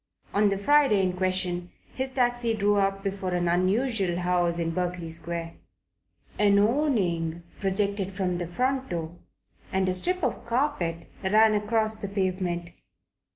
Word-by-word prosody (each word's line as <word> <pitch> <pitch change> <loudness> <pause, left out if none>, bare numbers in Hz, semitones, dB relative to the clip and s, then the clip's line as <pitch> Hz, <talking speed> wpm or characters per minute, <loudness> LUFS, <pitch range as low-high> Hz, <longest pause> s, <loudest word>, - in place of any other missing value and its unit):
On 205 0 +4
the 195 - 0
Friday 220 -2 +4
in 185 -1 +1
question 180 -1 -1 0.2
his 260 0 -2
taxi 245 -3 +1
drew 205 -1 +2
up 195 0 +1
before 195 -2 -2
an 175 0 0
unusual 195 +5 +1
looking 175 0 -2
house 175 -1 +1
in 165 -1 -1
Berkeley 175 -1 -3
Square. 165 0 -2 0.9
An 205 -1 +5
awning 200 - +1 0.2
projected 200 0 -1
from 185 -2 -2
the 175 - -3
front 260 +8 -1
door 165 -1 -4 0.6
and 190 0 +1
a 185 - +1
strip 360 - -1
of 250 -6 -1
carpet 230 - -1 0.2
ran 215 +3 +5
across 215 +1 +1
the 205 - -5
pavement. 185 -3 -2
195 Hz, 150 wpm, -27 LUFS, 175-220 Hz, 0.9 s, An